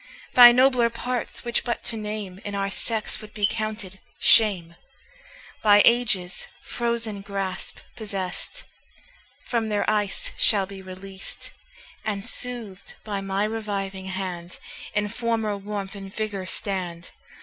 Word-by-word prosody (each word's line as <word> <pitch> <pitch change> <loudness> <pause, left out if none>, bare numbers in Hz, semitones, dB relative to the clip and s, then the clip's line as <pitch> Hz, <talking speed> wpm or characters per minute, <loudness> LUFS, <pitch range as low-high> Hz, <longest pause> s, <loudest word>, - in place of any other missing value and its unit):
Thy 245 -1 +11
nobler 250 -1 +5
parts, 245 +1 -3
which 240 -1 0
but 240 -2 -2
to 230 - -2
name 210 -3 -4
In 205 -1 -4
our 195 0 -1
sex 220 +1 -3
would 215 0 -12
be 210 -1 +3
counted 215 -3 -3 0.2
shame, 185 -7 +4 0.9
By 205 -1 +7
ages 215 -7 +2 0.2
frozen 230 -3 -2
grasp 195 -2 -4
possest, 200 - -5 0.8
From 230 -3 0
their 210 -1 +1
ice 215 - 0
shall 200 -4 +3
be 195 0 -9
released, 190 +1 -9 0.5
And, 205 -2 -2
soothed 240 -6 -2
by 205 -2 -3
my 195 +1 0
reviving 200 -3 -3
hand, 185 -2 -4 0.4
In 210 0 +2
former 225 -1 -1
warmth 200 -1 -4
and 195 -1 -8
vigour 205 -3 -3
stand. 180 -3 -3
205 Hz, 125 wpm, -25 LUFS, 195-225 Hz, 0.9 s, Thy